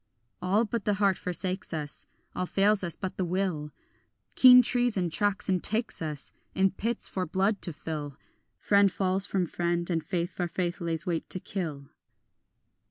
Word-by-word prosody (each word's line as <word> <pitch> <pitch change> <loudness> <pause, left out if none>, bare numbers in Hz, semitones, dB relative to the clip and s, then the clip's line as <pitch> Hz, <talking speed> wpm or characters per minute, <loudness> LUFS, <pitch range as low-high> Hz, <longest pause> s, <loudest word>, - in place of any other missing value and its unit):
All 200 +6 +2
but 225 -1 -3
the 210 - +2
heart 200 -2 +3
forsakes 180 0 -3
us, 150 -2 -6 0.3
All 185 - -2
fails 200 +1 +2
us 170 -2 -3
but 190 -2 -5
the 190 - 0
will; 175 -4 -1 0.6
Keen 250 -1 +9
treason 235 -8 +1
tracks 205 +3 0
and 185 -3 +1
takes 220 -2 -2
us 150 -3 -5 0.2
In 190 0 +3
pits 225 +4 -3
for 185 -2 -3
blood 195 +5 0
to 175 - -1
fill; 150 -2 -6 0.4
Friend 200 -1 +4
falls 190 +1 +1
from 190 -3 0
friend, 170 +1 -1
and 165 -2 0
faith 175 +1 -2
for 175 +1 -2
faith 175 +1 -3
lays 165 -1 -2
wait 170 -3 -2
to 185 - -3
kill. 155 -9 -5
185 Hz, 165 wpm, -28 LUFS, 170-200 Hz, 0.6 s, Keen